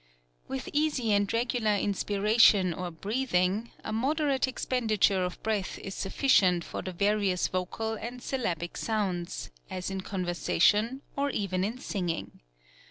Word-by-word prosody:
"With 135 - -4
easy 290 -6 +1
and 200 -1 +2
regular 230 -2 +1
inspiration 205 -1 +3
or 180 +1 -4
breathing, 200 +2 0
a 215 - -4
moderate 275 +3 +1
expenditure 220 -7 +1
of 180 0 -5
breath 210 -4 -1
is 195 - -7
sufficient 190 -5 +3
for - - -5
the 185 - -5
various 200 0 +1
vocal 185 +5 -2
and 235 +3 -6
syl 265 +2 -3
labic 170 -5 -2
sounds, 190 -6 -2 0.2
as 185 +1 -4
in 190 0 -3
conversation, 195 +6 +1
or 280 0 0
even 190 -7 -1
in 220 +5 -2
singing. 180 -9 -4
205 Hz, 135 wpm, -29 LUFS, 185-235 Hz, 0.2 s, inspiration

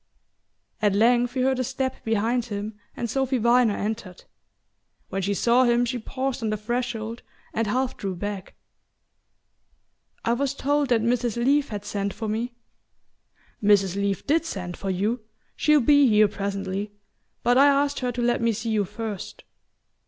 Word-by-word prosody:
At 205 -2 +3
length 240 +3 +3
he 260 - +1
heard 260 0 +2
a - - +1
step 260 +1 -3
behind 225 +2 0
him 210 -1 -4 0.2
and 235 - -2
Sophy 265 +2 0
Viner 235 -2 +3
entered. 210 -4 -4 0.9
When 195 +1 -2
she 200 +2 0
saw 240 +5 +4
him 240 0 +3
she 245 +1 -2
paused 260 +2 -3
on 220 - -1
the 215 - -1
threshold 235 0 -3 0.3
and 225 0 0
half 255 +4 -1
drew 195 -2 -3
back. 200 0 -5 1.7
"I 230 - +3
was 275 +2 -1
told 285 0 +1
that 230 -3 +3
Mrs. 240 -1 +1
Leath 275 +4 +2
had 205 -1 -5
sent 200 -1 -3
for 220 - -4
me." 235 +3 -2 1.1
"Mrs. 200 -3 +4
Leath 200 -1 -1
DID 320 +3 +2
send 180 - -5
for 195 - -5
you. 205 +6 0 0.4
She'll 300 -1 +4
be 285 +2 +5
here 215 -2 +5
presently; 200 0 -4 0.5
but 245 +2 +4
I 280 - +7
asked 285 0 +2
her 250 -1 -1
to 240 0 -3
let 240 0 +1
me 230 -1 +2
see 225 +2 -3
you 210 -2 +1
first." 215 0 -6
230 Hz, 165 wpm, -25 LUFS, 205-250 Hz, 1.7 s, I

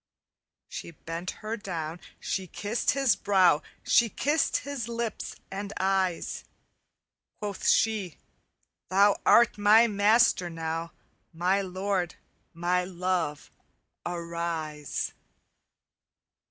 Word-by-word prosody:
"She - - -7
bent 165 +2 -6 0.2
her 220 +1 -1
down, 170 -6 -5 0.2
she 190 -2 -3
kissed 210 +6 -2
his 275 -3 +3
brow, 185 -7 +4 0.2
She 235 -1 +4
kissed 295 +7 +1
his 280 -5 -4
lips 235 -2 -4 0.2
and 200 +1 -5
eyes. 190 -2 0 0.9
Quoth 205 -2 -4
she, 210 -6 +2 0.7
'Thou 200 +2 +5
art 235 -3 +5
my 215 +3 +7
master 210 -3 +3
now, 165 0 -4 0.4
My 180 +4 +1
lord, 185 -1 -2 0.4
my 175 +2 0
love, 180 -4 -2 0.5
arise! 170 -3 -3
185 Hz, 95 wpm, -28 LUFS, 170-210 Hz, 0.9 s, my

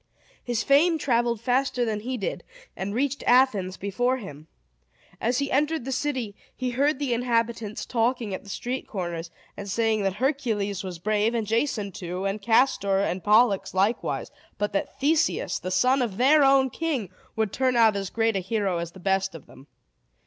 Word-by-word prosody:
His 240 -2 -1
fame 320 +5 +4
traveled 235 -5 +1
faster 250 0 +1
than 215 -2 -2
he 250 +4 -4
did, 200 - -4 0.3
and 200 +2 -4
reached 280 +2 -1
Athens 220 -8 +3
before 245 +6 0
him. 155 - -10 0.7
As 240 +2 0
he 280 0 -1
entered 300 0 +1
the 270 - -3
city, 255 -6 -2 0.2
he 255 -1 -2
heard 280 +4 +1
the 275 -3 -1
inhabitants 230 -2 -1
talking 230 -3 0
at - - -4
the 200 - -13
street 250 +6 -4
corners, 175 -4 -4 0.3
and 200 - -7
saying 220 +1 +1
that 195 -1 0
Hercules 220 -6 -1
was 185 -2 -6
brave, 215 +5 0
and 225 -2 -1
Jason 220 -2 -1
too, 180 +1 -5
and 195 +2 -2
Castor 225 -3 +3
and 190 -2 -1
Pollux 210 -2 +3
likewise, 200 +5 0 0.3
but 205 0 -2
that 195 - -3
Theseus, 310 +4 +1
the 185 - -5
son 255 +9 +3
of 220 -6 -2
their 285 +4 +5
own 270 -1 +4
king, 275 - -2 0.2
would 220 -3 -1
turn 260 -1 +1
out 225 -3 +5
as 195 -2 -3
great 225 0 0
a - - +1
hero 190 -2 -1
as 170 0 -5
the 190 - -12
best 190 0 0
of 160 - -10
them. 135 - -16
225 Hz, 180 wpm, -25 LUFS, 195-255 Hz, 0.7 s, their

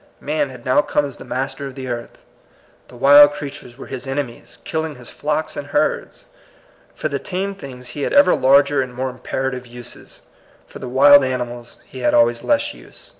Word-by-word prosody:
Man 150 -1 -1
had 125 -2 -12
now 130 +3 +4
come 150 - 0
as 140 -3 -8
the - - -10
master 135 +2 -3
of 135 - -10
the 130 -1 -6
earth. 120 -1 -6 0.6
The - - -15
wild 145 +3 +7
creatures 140 -4 -8
were - - -9
his 135 0 -7
ene 140 +1 -1
mies, 120 -2 -14
killing 160 -2 -3
his 125 -2 -11
flocks 150 +1 -2
and 145 - -6
herds. - - -1 0.7
For - - -2
the 140 -2 -3
tame 195 +4 -3
things 130 -9 -10
he 145 - -6
had - - -1
ever 285 0 +6
larger 140 +1 +4
and 125 -1 -6
more 130 +1 -2
imperative 125 0 -4
uses. 120 0 -10 0.4
For - - -12
the 125 - -6
wild 140 +2 +7
ani 130 -1 -1
mals 120 -1 -10
he 130 - -11
had 125 - +2
always 120 0 +3
less 290 0 +1
use. - - -15
135 Hz, 200 wpm, -20 LUFS, 125-145 Hz, 0.7 s, wild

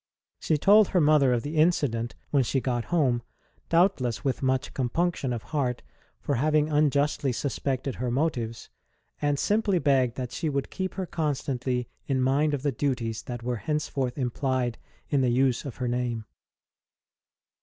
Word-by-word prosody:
She 155 - +1
told 205 +6 +6
her 180 - +2
mother 150 -4 +5
of 120 -2 +1
the 150 +2 -4
incident 140 -9 +1 0.2
when 140 - +4
she 135 +3 0
got 120 -2 -1
home, 135 -9 +1 0.5
doubtless 165 - +2
with 135 - 0
much 130 -1 0
compunction 140 +2 -1
of 115 -2 -3
heart 130 -5 -1 0.4
for - - -2
having 150 +3 +2
unjustly 145 -2 +2
suspected 135 +1 -2
her 125 - 0
motives, 120 -4 -2 0.5
and 145 -1 +1
simply 205 +2 +2
begged 130 -6 +2
that 125 -2 -4
she 160 - -2
would 140 -2 -2
keep 190 -1 -3
her 190 - -2
constantly 135 -6 -2 0.2
in 135 -2 +1
mind 140 +3 +2
of 135 - -6
the 145 - +1
duties 115 -4 -2
that 120 -1 -6
were 120 0 -1
henceforth 145 -2 -2
implied 130 -1 -1 0.3
in 140 -2 +3
the 130 - +2
use 130 +1 +2
of 135 - -6
her 125 - -3
name. 120 -2 -2
135 Hz, 160 wpm, -27 LUFS, 125-150 Hz, 0.5 s, told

